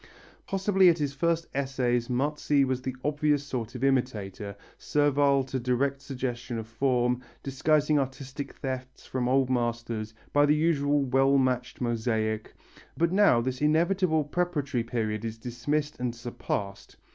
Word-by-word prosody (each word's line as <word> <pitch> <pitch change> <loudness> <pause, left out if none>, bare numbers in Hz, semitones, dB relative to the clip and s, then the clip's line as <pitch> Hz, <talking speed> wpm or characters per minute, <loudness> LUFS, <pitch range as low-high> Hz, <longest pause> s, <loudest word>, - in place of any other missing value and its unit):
Possibly 195 -1 +4
at 170 - +3
his 145 -3 -2
first 165 +3 0
essays 130 -3 0
Marzi 140 +2 +1
was 130 -1 -1
the 130 0 -4
obvious 150 -1 +1
sort 125 -4 -5
of 125 - -5
imitator, 110 -7 -1 0.2
servile 145 -2 +2
to 130 0 -3
direct 130 +3 0
suggestion 125 -3 -4
of 110 - -4
form, 125 +1 +1 0.2
disguising 150 +2 +2
artistic 135 +1 -5
thefts 130 -1 -6
from 125 -1 -2
old 130 0 +2
masters 115 -2 -2 0.2
by 145 0 +5
the 150 - +4
usual 145 -2 +2
well 135 +1 +3
matched 130 -1 0
mosaic, 110 -2 -1 0.4
but 170 0 +2
now 190 - +5
this 130 +2 -3
inevitable 160 +1 +2
preparatory 145 -5 -1
period 110 -3 -2
is 115 -1 -4
dismissed 145 +6 -2
and 125 -1 -2
surpassed. 105 -4 -5
130 Hz, 140 wpm, -28 LUFS, 120-145 Hz, 0.4 s, by